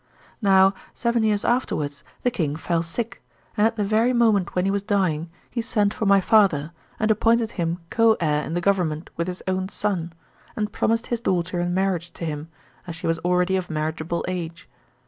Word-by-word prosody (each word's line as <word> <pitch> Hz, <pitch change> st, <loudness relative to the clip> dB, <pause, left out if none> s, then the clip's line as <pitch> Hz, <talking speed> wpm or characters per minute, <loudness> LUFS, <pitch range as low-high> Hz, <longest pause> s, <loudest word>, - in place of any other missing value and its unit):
Now 195 Hz, -1 st, +5 dB, 0.2 s
seven 235 Hz, -1 st, +1 dB
years 215 Hz, -1 st, +1 dB
afterwards 145 Hz, -, -1 dB, 0.2 s
the 245 Hz, -, +2 dB
king 155 Hz, -9 st, -1 dB
fell 165 Hz, +1 st, 0 dB
sick, 210 Hz, +8 st, -5 dB, 0.3 s
and 210 Hz, 0 st, +4 dB
at 230 Hz, -, -3 dB
the 210 Hz, -, 0 dB
very 220 Hz, +5 st, +2 dB
moment 220 Hz, -6 st, +2 dB
when 180 Hz, 0 st, +1 dB
he 195 Hz, -, +2 dB
was 200 Hz, 0 st, 0 dB
dying, 185 Hz, -6 st, 0 dB, 0.2 s
he 235 Hz, -, -1 dB
sent 210 Hz, -3 st, +1 dB
for 220 Hz, -, -2 dB
my 200 Hz, 0 st, +6 dB
father, 185 Hz, -7 st, +3 dB, 0.3 s
and 220 Hz, 0 st, +2 dB
appointed 230 Hz, +1 st, +2 dB
him 170 Hz, -3 st, -2 dB
co 225 Hz, -1 st, +4 dB
heir 150 Hz, -3 st, +1 dB
in 165 Hz, -, -4 dB
the 175 Hz, -, 0 dB
government 175 Hz, -5 st, 0 dB
with 170 Hz, +1 st, -2 dB
'his 180 Hz, 0 st, -5 dB
own 185 Hz, 0 st, -1 dB
son, 190 Hz, -6 st, -2 dB, 0.4 s
and 210 Hz, -1 st, -2 dB
promised 230 Hz, +1 st, +1 dB
his 235 Hz, -, -1 dB
daughter 180 Hz, -4 st, 0 dB
in 175 Hz, 0 st, -1 dB
marriage 185 Hz, -3 st, -1 dB
to 170 Hz, -, -6 dB
him 150 Hz, -1 st, -4 dB, 0.4 s
as 170 Hz, -, -5 dB
she 170 Hz, +1 st, -7 dB
was 165 Hz, 0 st, +1 dB
already 180 Hz, +2 st, +1 dB
of 185 Hz, -1 st, -2 dB
marriageable 160 Hz, +2 st, -2 dB
age. 170 Hz, -2 st, -5 dB
185 Hz, 195 wpm, -24 LUFS, 170-215 Hz, 0.4 s, my